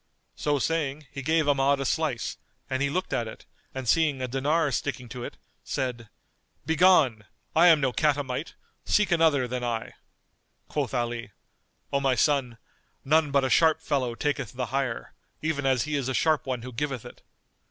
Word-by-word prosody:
So 145 Hz, -1 st, 0 dB
saying, 150 Hz, 0 st, -1 dB
he 140 Hz, -, -6 dB
gave 155 Hz, +2 st, +1 dB
Ahmad 140 Hz, 0 st, +3 dB
a 135 Hz, -, -2 dB
slice, 150 Hz, -7 st, -1 dB, 0.3 s
and 130 Hz, 0 st, 0 dB
he 140 Hz, -, +2 dB
looked 185 Hz, +6 st, -2 dB
at 115 Hz, -, 0 dB
it 110 Hz, -, -10 dB, 0.3 s
and 130 Hz, -2 st, -6 dB
seeing 150 Hz, +1 st, +3 dB
a 130 Hz, -, -2 dB
dinar 145 Hz, +4 st, +1 dB
sticking 125 Hz, -1 st, -3 dB
to 120 Hz, +2 st, -6 dB
it, -, -, -7 dB, 0.3 s
said 120 Hz, -4 st, -3 dB, 0.6 s
"Begone! 160 Hz, -, +4 dB, 0.3 s
I 170 Hz, +2 st, +7 dB
am 165 Hz, -3 st, +7 dB
no 135 Hz, -3 st, 0 dB
catamite: 145 Hz, -1 st, -1 dB, 0.3 s
seek 210 Hz, -2 st, +2 dB
another 160 Hz, -6 st, +3 dB
than 125 Hz, 0 st, -3 dB
I." 115 Hz, -2 st, -3 dB, 0.8 s
Quoth 140 Hz, -3 st, -2 dB
Ali, 120 Hz, -3 st, -3 dB, 0.6 s
"O 140 Hz, -, +3 dB
my 135 Hz, -2 st, +2 dB
son, 130 Hz, -4 st, +1 dB, 0.5 s
none 155 Hz, +2 st, +3 dB
but 140 Hz, -1 st, +2 dB
a -, -, 0 dB
sharp 160 Hz, -1 st, +4 dB
fellow 135 Hz, -7 st, -1 dB
taketh 140 Hz, -4 st, -2 dB
the 125 Hz, 0 st, -2 dB
hire, 135 Hz, -4 st, -2 dB, 0.3 s
even 145 Hz, -3 st, 0 dB
as 130 Hz, -3 st, +2 dB
he 150 Hz, 0 st, -2 dB
is 135 Hz, -2 st, -1 dB
a 130 Hz, -, -1 dB
sharp 155 Hz, -3 st, +2 dB
one 125 Hz, -3 st, -2 dB
who 125 Hz, 0 st, -8 dB
giveth 135 Hz, -1 st, -3 dB
it. -, -, -12 dB
140 Hz, 175 wpm, -27 LUFS, 125-155 Hz, 0.8 s, I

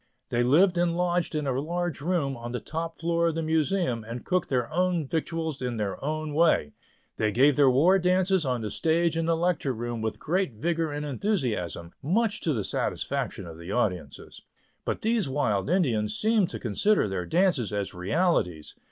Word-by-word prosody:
They 120 Hz, -, +1 dB
lived 175 Hz, +9 st, +4 dB
and 170 Hz, -1 st, +1 dB
lodged 175 Hz, -2 st, 0 dB
in 150 Hz, -1 st, -1 dB
a 130 Hz, -1 st, 0 dB
large 175 Hz, -1 st, -3 dB
room 155 Hz, -4 st, 0 dB
on 120 Hz, 0 st, -7 dB
the 125 Hz, -, -2 dB
top 165 Hz, +1 st, -5 dB
floor 170 Hz, 0 st, +1 dB
of 165 Hz, -, -1 dB
the 165 Hz, -, -1 dB
Museum, 160 Hz, -, 0 dB
and 115 Hz, +2 st, -7 dB
cooked 185 Hz, 0 st, 0 dB
their 125 Hz, -3 st, 0 dB
own 175 Hz, -3 st, +1 dB
victuals 160 Hz, -1 st, -2 dB
in 125 Hz, -2 st, -2 dB
their 105 Hz, +1 st, -3 dB
own 155 Hz, +1 st, -2 dB
way. 155 Hz, -, +3 dB, 0.4 s
They 110 Hz, -1 st, +1 dB
gave 135 Hz, +6 st, +4 dB
their 140 Hz, -1 st, +5 dB
war 165 Hz, +10 st, +4 dB
dances 185 Hz, 0 st, +2 dB
on 125 Hz, -4 st, -1 dB
the 105 Hz, -, -4 dB
stage 165 Hz, 0 st, +1 dB
in 165 Hz, 0 st, -1 dB
the 165 Hz, -1 st, +2 dB
Lecture 170 Hz, -5 st, 0 dB
Room 120 Hz, 0 st, -4 dB
with 110 Hz, -1 st, -2 dB
great 180 Hz, -4 st, -1 dB
vigor 165 Hz, +7 st, -1 dB
and 145 Hz, 0 st, -4 dB
enthusiasm, 125 Hz, -, -2 dB
much 210 Hz, -, 0 dB
to 160 Hz, -, 0 dB
the 110 Hz, -8 st, -1 dB
satisfaction -, -, -2 dB
of 80 Hz, -1 st, -10 dB
the 85 Hz, +3 st, -7 dB
audiences. 90 Hz, -8 st, -3 dB, 0.4 s
But -, -, -3 dB
these 220 Hz, -8 st, +1 dB
wild 120 Hz, -6 st, 0 dB
Indians 115 Hz, -, +1 dB
seemed 215 Hz, -4 st, +2 dB
to -, -, -5 dB
consider 125 Hz, -, +2 dB
their 95 Hz, -3 st, -3 dB
dances 170 Hz, -, +2 dB
as 100 Hz, -1 st, -3 dB
realities. 90 Hz, -, 0 dB
155 Hz, 185 wpm, -27 LUFS, 120-175 Hz, 0.4 s, their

